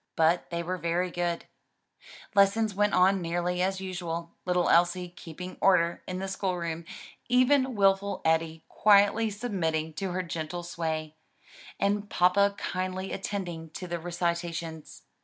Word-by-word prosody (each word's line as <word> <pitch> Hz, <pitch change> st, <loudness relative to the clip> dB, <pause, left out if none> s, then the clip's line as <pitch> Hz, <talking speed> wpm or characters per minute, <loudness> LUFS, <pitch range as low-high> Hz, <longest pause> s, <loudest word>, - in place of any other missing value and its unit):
But 165 Hz, +2 st, +2 dB
they 170 Hz, 0 st, -2 dB
were 185 Hz, +2 st, -3 dB
very 170 Hz, +2 st, 0 dB
good; 175 Hz, -1 st, -2 dB, 0.9 s
lessons 205 Hz, +1 st, +3 dB
went 205 Hz, +1 st, +2 dB
on 185 Hz, +1 st, +4 dB
nearly 175 Hz, +1 st, -1 dB
as 190 Hz, +1 st, 0 dB
usual, 170 Hz, -3 st, -4 dB
little 180 Hz, -1 st, +2 dB
Elsie 175 Hz, +1 st, +3 dB
keeping 180 Hz, +1 st, -9 dB
order 175 Hz, -3 st, +3 dB
in 185 Hz, -, -3 dB
the 190 Hz, +1 st, -3 dB
school 190 Hz, -1 st, -2 dB
room, 170 Hz, -1 st, -4 dB, 0.4 s
even 255 Hz, +1 st, +3 dB
wilful 195 Hz, 0 st, +2 dB
Eddie 160 Hz, 0 st, +1 dB
quietly 210 Hz, +2 st, +4 dB
submitting 170 Hz, -8 st, -2 dB
to 195 Hz, +4 st, -3 dB
her 185 Hz, 0 st, -1 dB
gentle 170 Hz, +1 st, -4 dB
sway, 160 Hz, -2 st, -4 dB, 0.6 s
and 205 Hz, +1 st, 0 dB
grandpa 185 Hz, +3 st, +4 dB
kindly 185 Hz, +1 st, -3 dB
attending 175 Hz, -5 st, -4 dB
to 185 Hz, -, -5 dB
the 175 Hz, -1 st, -3 dB
recitations. 170 Hz, -2 st, -3 dB
180 Hz, 140 wpm, -28 LUFS, 170-195 Hz, 0.9 s, on